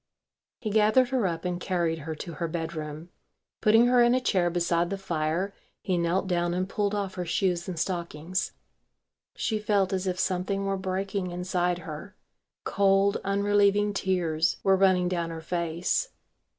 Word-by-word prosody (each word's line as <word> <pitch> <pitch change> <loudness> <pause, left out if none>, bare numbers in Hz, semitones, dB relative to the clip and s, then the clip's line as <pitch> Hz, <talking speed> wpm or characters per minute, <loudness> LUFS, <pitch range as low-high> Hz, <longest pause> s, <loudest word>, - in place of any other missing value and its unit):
He 220 -4 -4
gathered 220 +4 +4
her 255 -7 +1
up 165 0 -4
and 180 -1 -2
carried 170 -3 0
her 160 +1 -5
to 170 +2 -7
her 165 +2 -3
bedroom. 160 -1 -5 0.5
Putting 225 +2 +6
her 245 0 +5
in 240 +1 +5
a - - +3
chair 185 -8 +1
beside 170 0 +1
the 195 - -2
fire 170 +1 -1 0.3
he 185 - -1
knelt 175 +3 +1
down 175 -1 0
and 185 +1 -1
pulled 205 +1 -1
off 200 -2 -2
her 180 -1 -3
shoes 175 0 0
and 180 - -5
stockings. 170 +1 -2 0.8
She 215 -2 -1
felt 200 -3 +1
as 190 0 -1
if 180 -1 -1
something 190 +2 -1
were 195 0 0
breaking 190 0 -2
inside 180 0 -1
her. 165 +3 -8 0.5
Cold 200 0 +3
unrelieving 205 +1 +2
tears 175 -4 0
were 195 0 +5
running 185 -2 +3
down 170 -2 -1
her 165 -1 -6
face. 170 - -1
185 Hz, 165 wpm, -27 LUFS, 170-200 Hz, 0.8 s, Putting